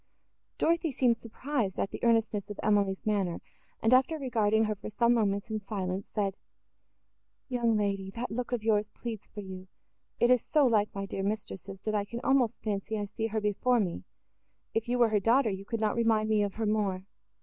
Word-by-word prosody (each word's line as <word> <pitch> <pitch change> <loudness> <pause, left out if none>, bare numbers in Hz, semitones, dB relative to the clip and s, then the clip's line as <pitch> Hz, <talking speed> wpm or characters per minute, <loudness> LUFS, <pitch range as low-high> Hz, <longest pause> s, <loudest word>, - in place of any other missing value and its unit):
Dorothée 335 -1 +2
seemed 245 -3 +2
surprised 230 -3 -3
at - - -1
the - - -7
earnestness 225 -3 +2
of 205 - -7
Emily's 200 -2 +1
manner, 195 -5 0 0.4
and, 225 +3 +4
after 265 +5 +4
regarding 220 -6 +2
her 215 -1 0
for 210 - -8
some 235 +3 +3
moments, 200 -2 0
in 215 - -1
silence, 195 -2 -4
said, 200 -2 -1 1.2
"Young 235 -3 +2
lady! 195 -2 -1
that 235 0 -4
look 245 +2 -3
of 240 -3 -1
yours 215 -1 +2
pleads 225 -4 -7
for 205 - -8
you—it 190 +5 -4
is 250 -2 +4
so 300 -3 +3
like 215 -4 +3
my 195 0 -3
dear 195 0 -4
mistress's, 195 -2 -4
that 215 - -2
I 205 -1 +1
can 235 +3 -6
almost 265 -4 +2
fancy 215 +1 -2
I 205 - -2
see 220 +2 -3
her 220 0 -1
before 215 +4 +2
me; 175 - -2 0.7
if 225 +1 -1
you 245 - +1
were 240 -2 +5
her 215 -1 +2
daughter, 230 +3 +3
you 195 0 -5
could 230 +1 -3
not 215 -1 +1
remind 225 -2 +2
me 215 -1 +3
of 200 -1 -1
her 225 - -1
more. 200 -3 0
215 Hz, 195 wpm, -30 LUFS, 200-235 Hz, 1.2 s, were